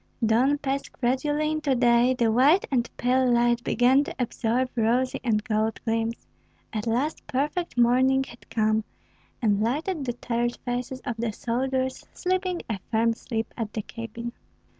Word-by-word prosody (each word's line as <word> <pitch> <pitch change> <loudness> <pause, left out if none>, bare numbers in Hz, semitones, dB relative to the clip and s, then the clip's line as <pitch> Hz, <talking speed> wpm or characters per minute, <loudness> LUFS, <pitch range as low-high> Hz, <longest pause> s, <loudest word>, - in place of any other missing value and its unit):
Dawn 250 +6 +3
passed 275 -1 -3
gradually 290 +5 0
into 305 -3 0
day; 240 +1 +4
the 235 -2 +2
white 280 - +4
and 240 -3 +1
pale 255 +1 +2
light 240 0 +3
began 260 +3 +4
to - - -6
absorb 250 +1 0
rosy 245 +3 +1
and 215 -4 +1
golden 220 0 0
gleams; 225 0 -1 0.5
at 215 +1 -3
last 255 +7 -1
perfect 295 +4 -2
morning 260 +3 +4
had 240 -2 -14
come, 215 -1 +1 0.6
and 205 -2 +3
lighted 295 - -1
the 245 - -1
tired 240 0 -2
faces 245 +1 -3
of 240 -4 -4
the 230 -1 -1
soldiers 260 +4 -2
sleeping 370 -1 -1
a 220 -4 -3
firm 230 0 +2
sleep 225 -1 -4
at 225 -3 -4
the 215 - -3
cabin. 230 +1 -7
245 Hz, 155 wpm, -26 LUFS, 230-265 Hz, 0.6 s, day